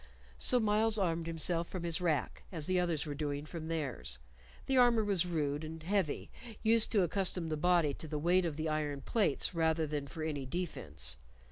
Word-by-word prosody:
So 250 - +3
Myles 220 0 +3
armed 170 -4 0
himself 165 +1 +1
from 185 -2 -5
his 170 0 -1
rack 160 -6 0
as 160 -5 -3
the 185 +1 +2
others 170 -4 0
were 150 - -3
doing 145 0 -3
from 160 0 -6
theirs. 130 - -3 0.5
The 270 - +1
armor 240 -3 +5
was 195 -4 +2
rude 150 -3 -1
and 160 0 -7
heavy, 185 -4 0 0.3
used 225 0 +4
to 200 -4 +5
accustom 180 -2 -1
the 155 - 0
body 165 -2 +3
to 160 - -7
the 150 0 -3
weight 175 +4 +3
of 160 -3 -2
the 160 0 -1
iron 150 -2 -1
plates 200 - +1
rather 160 -1 +2
than 145 -2 -3
for 155 +3 -6
any 145 -4 -3
defence. 80 - -3
165 Hz, 195 wpm, -33 LUFS, 150-180 Hz, 0.5 s, armor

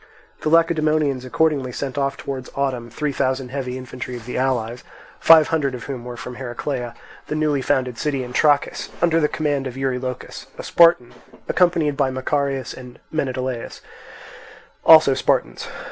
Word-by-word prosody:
The - - 0
Lacedaemonians 155 -5 +2
accordingly 140 -1 +1
sent 135 +2 -4
off 140 -1 -1
towards 130 -2 -6
autumn 130 -4 -2
three 150 +5 -2
thousand 130 -1 -1
heavy 130 -1 -4
infantry 125 0 -7
of 120 -3 -9
the 125 - -6
allies, 125 -2 -1 0.4
five 160 -2 +7
hundred 145 -5 0
of 120 - -8
whom 130 -4 -6
were 120 -1 -7
from 125 +1 -8
Heraclea, 125 -1 -4 0.3
the 150 - -3
newly 150 -3 +1
founded 130 -3 0
city 140 -3 -1
in 125 0 -8
Trachis, 145 0 +2
under 165 -1 +3
the 150 - +3
command 145 -3 -1
of 130 0 -7
Eurylochus, 130 -1 -4
a - - -7
Spartan, 165 -8 +4 0.3
accompanied 165 -5 +2
by 135 -2 +2
Macarius 135 +1 -2
and 125 -1 -11 0.2
Menedaius, 130 -5 -3 1.0
also 155 -4 +8
Spartans. - - 0
135 Hz, 155 wpm, -21 LUFS, 125-150 Hz, 1.0 s, also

